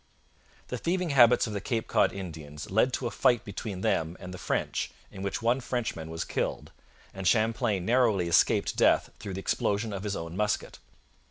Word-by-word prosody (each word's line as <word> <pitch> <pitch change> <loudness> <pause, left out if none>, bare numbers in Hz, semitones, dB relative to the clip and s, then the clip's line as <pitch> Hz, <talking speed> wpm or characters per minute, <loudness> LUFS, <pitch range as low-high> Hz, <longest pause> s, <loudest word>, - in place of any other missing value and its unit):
The 125 - -3
thieving 180 -1 0
habits 120 -4 +6
of 110 - -5
the 100 - -3
Cape 115 +2 -2
Cod - - +3
Indians 80 -5 -8
led 110 +6 +3
to 125 - -2
a 120 - -1
fight 120 -2 +2
between 100 -2 -5
them 80 -2 0
and 90 0 -8
the 90 - -8
French - - -1 0.2
in 95 - -9
which 100 +2 -3
one 120 +3 +2
Frenchman 115 -11 -3
was 80 0 -4
killed, - - -3 0.4
and 95 -1 -3
Champlain 110 -3 +2
narrowly 115 -7 +3
escaped 85 - +3
death - - +3
through 95 -2 -6
the - - -3
explosion 105 +2 0
of 100 - -4
his 100 -1 -3
own 85 +1 -6
musket. 105 +1 -1
100 Hz, 185 wpm, -28 LUFS, 90-120 Hz, 0.4 s, habits